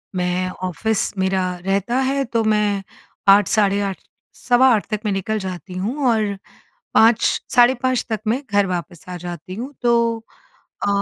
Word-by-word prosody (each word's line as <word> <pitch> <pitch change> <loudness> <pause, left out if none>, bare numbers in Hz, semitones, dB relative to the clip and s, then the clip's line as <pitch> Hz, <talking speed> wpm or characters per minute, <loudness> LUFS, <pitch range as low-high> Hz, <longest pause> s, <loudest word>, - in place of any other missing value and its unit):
मैं 180 0 -1
ऑफ़िस 195 +5 -1
मेरा 190 0 +1 0.2
रहता 200 +5 0
है 275 0 0
तो 230 -3 -1
मैं 210 -2 +1 0.4
8, 200 0 +6
साढ़े 200 -2 +2
8, 195 -2 -2 0.4
सवा 250 +1 +3
8 210 - -2
तक 215 - -1
मैं 210 - +1
निकल 205 +3 -2
जाती 185 -1 -7
हूँ 235 +10 -2
और 210 -3 0 0.6
5,, 225 0 +5 0.3
साढ़े 245 +1 +6
5 255 -1 +1
तक 220 - -1
मैं 245 +5 +1
घर 205 -1 +3
वापस 175 -2 -5
आ 180 - -5
जाती 175 +1 -7
हूँ 255 +6 -6
तो 240 -1 +3 0.9
अ, - - +1
205 Hz, 165 wpm, -20 LUFS, 185-230 Hz, 0.9 s, 8